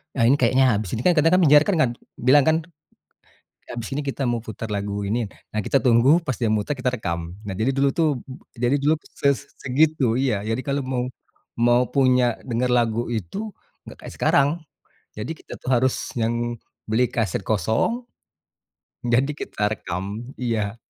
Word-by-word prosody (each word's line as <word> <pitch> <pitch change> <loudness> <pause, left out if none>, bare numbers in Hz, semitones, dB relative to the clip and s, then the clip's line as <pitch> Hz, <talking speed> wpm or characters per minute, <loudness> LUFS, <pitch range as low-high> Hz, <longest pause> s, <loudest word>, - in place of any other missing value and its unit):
Nah, 125 - +2
ini 135 - +5
kayaknya 130 +2 +4
habis 100 -3 -2
ini, 115 - -3
kan 180 - +6
kadang-kadang 165 +4 +4
penyiar 150 +1 +7
kan 200 - +2 0.5
bilang 145 +1 +7
kan, 160 - +5 1.1
habis 120 -1 -5
ini 145 - -1
kita 135 - -5
mau 120 -1 -1
putar 110 +1 -6
lagu 100 0 -3
ini. 115 +4 0 0.3
Nah, 110 - -1
kita 135 - +3
tunggu 120 +1 +4 0.2
pas 130 - -1
dia 115 - +2
muter, 105 +7 0
kita 130 - +1
rekam. 85 -5 -4
Nah, 95 - -4
jadi 115 +5 +2
dulu 140 0 +3
tuh, 165 -2 +2 0.5
jadi 120 +3 +2
dulu 150 +2 +3 0.3
ses 140 -1 +4 0.2
segitu, 135 -3 +2
iya, 125 -7 +1
jadi 115 - 0
kalau 140 0 0
mau 125 -1 -1 0.5
mau 120 +1 +4
punya 125 -3 +3
denger 120 +2 +1
lagu 115 -1 +1
itu, 100 - -4 0.5
enggak - - -11
kayak - - -8
sekarang. 140 0 +3 0.7
Jadi 105 +9 -4
kita - - -11
tuh - - -5
harus 130 +1 +2 0.3
yang 115 +1 +1 0.6
beli 120 +3 +3
kaset 105 -5 -1
kosong, 110 - 0 1.0
jadi 125 +4 +2
kita 105 0 -2
rekam, 90 -2 -5 0.3
iya. 110 -4 -1
120 Hz, 165 wpm, -23 LUFS, 110-135 Hz, 1.1 s, penyiar